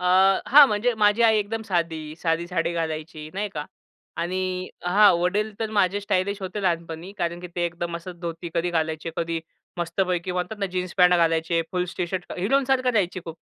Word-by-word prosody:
अ, - - -5 0.5
हां, 290 +1 +10
म्हणजे 220 +3 +1
माझी 210 +2 +4
आई 220 -1 +5
एकदम 215 +2 -2
साधी, 160 -4 -2
साधी 165 0 0
साडी 170 -1 -1
घालायची 155 -1 -4
नाही 205 +1 -2
का 150 -1 -3 0.5
आणि 185 +1 -2 0.2
हां, 200 +3 +6
वडील 210 +5 0
तर 220 -1 -1
माझे 195 +2 +2
स्टायलिश 200 0 -1
होते 200 +2 -4
लहानपणी. 170 0 -2
कारण 170 -1 -2
की 180 - -6
ते 175 - +1
एकदम 170 0 -4
असंच 175 +1 -9
धोती 170 0 -5
कधी 175 +1 0
घालायचे, 160 0 -1
कधी 165 -1 -2 0.4
मस्तपैकी 180 +1 -1
म्हणतात 180 +4 -3
ना, 200 - 0
जीन्स 180 -1 -3
पॅन्ट 180 0 +6
घालायचे, 165 0 +2
फुल 180 -1 0
टी 175 - 0
शर्ट 180 0 -5
हिरोंसारखं 260 +5 +2
रहायचे 185 -4 0
खूप. 165 -2 -7
180 Hz, 180 wpm, -24 LUFS, 170-200 Hz, 0.5 s, हां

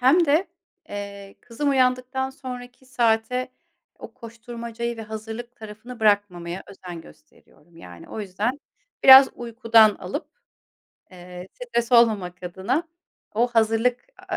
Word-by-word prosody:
hem 290 +8 +5
de, 310 +7 +2 0.4
eee, 200 -1 -8
kızım 280 +5 -2
uyandıktan 255 0 +1
sonraki 250 -1 -10
saate 240 +1 0 0.5
o - - -11
koşturmacayı 235 0 -7
ve 225 - -7
hazırlık 220 +3 -8
tarafını 220 +2 -11
bırakmamaya 190 -4 0
özen 180 -3 -10
gösteriyorum, 160 +1 -21
yani. 90 - -13
O 220 - -6
yüzden 210 +8 -3 0.4
biraz 265 0 +10
uykudan 230 -2 +4
alıp, - - -6 0.8
eee, 180 0 -11
stres 255 - -3
olmamak 205 -7 +3
adına 205 - -2 0.5
o 235 +3 +3
hazırlık 225 +1 +1
a - - -16
a - - -4
230 Hz, 120 wpm, -23 LUFS, 205-250 Hz, 0.8 s, biraz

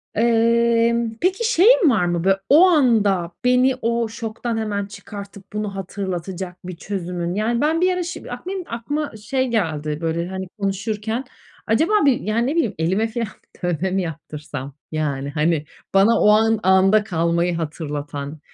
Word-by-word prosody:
Emm, 230 0 +2
peki, 385 +6 +1
şeyin 435 -1 +6
var 220 -8 +2
mı 175 -1 -1
bö 195 +1 +4 0.2
o 310 +6 +8
anda 215 - +3
beni 250 +1 +4
o 235 0 0
şoktan 225 +1 -4
hemen 205 -2 -2
çıkartıp 200 0 -10
bunu 210 -2 -3
hatırlatacak 185 -1 -5
bir 185 - -6
çözümün? 175 -2 -4
Yani 230 +3 0
ben 315 +3 +1
bir 370 0 +3
ara 360 0 -2
şim 345 +1 -6 0.2
benim 380 -2 -4
de - - -22
aklıma 290 +6 -3
şey 260 +5 -1
geldi, 155 -10 -1
böyle, 165 +1 -1
hani, 190 0 -5
konuşurken 210 +4 -2 0.4
acaba 310 - +2
bir 270 -4 +4
yani, 230 +3 0
ne 290 - -1
bileyim, 320 - +1
elime 190 +7 +1
filan 230 0 -3 0.4
dövme 175 +1 -1
mi 190 +1 +1
yaptırsam? 150 -4 -7 0.2
Yani 140 -3 -2
hani 155 +1 0 0.3
bana 195 +4 +5
o - - +5
an 220 +1 +4
anda 190 +3 +4
kalmayı 170 -2 0
hatırlatan 150 -2 -5
205 Hz, 155 wpm, -21 LUFS, 175-235 Hz, 0.4 s, o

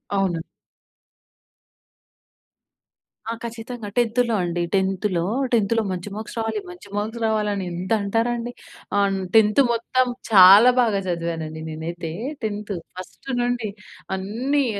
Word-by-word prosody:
అవును. 185 -4 +1 2.9
ఆ! - - -1
ఖచ్చితంగా 230 -1 -6
10థ్ 235 -1 +2
అండి. 175 0 -1
టెంత్‌లో 190 -2 0 0.3
టెంత్‌లో 225 0 +3
మంచి 185 +2 -4
మార్క్స్ 220 +2 -7
రావాలి, 225 - -1
మంచి 355 -12 -11
మార్క్స్ 225 +3 -3
రావాలని 210 -3 0
ఎంత 180 +3 -5
అంటారండి. 235 +3 -1 0.5
అన్ 195 -1 +2 0.2
10థ్ 215 +4 +6
మొత్తం 255 +2 +1 0.2
చాలా 200 +5 +9
బాగా 215 -4 +2
చదివానండి 165 -2 -3
నేనైతే 165 +1 -5 0.3
టెంతు. 205 -2 -3 0.2
ఫస్ట్ 185 +8 -10
నుండి 240 -3 -1 0.5
అన్నీ 245 +9 0
210 Hz, 105 wpm, -23 LUFS, 185-235 Hz, 2.9 s, చాలా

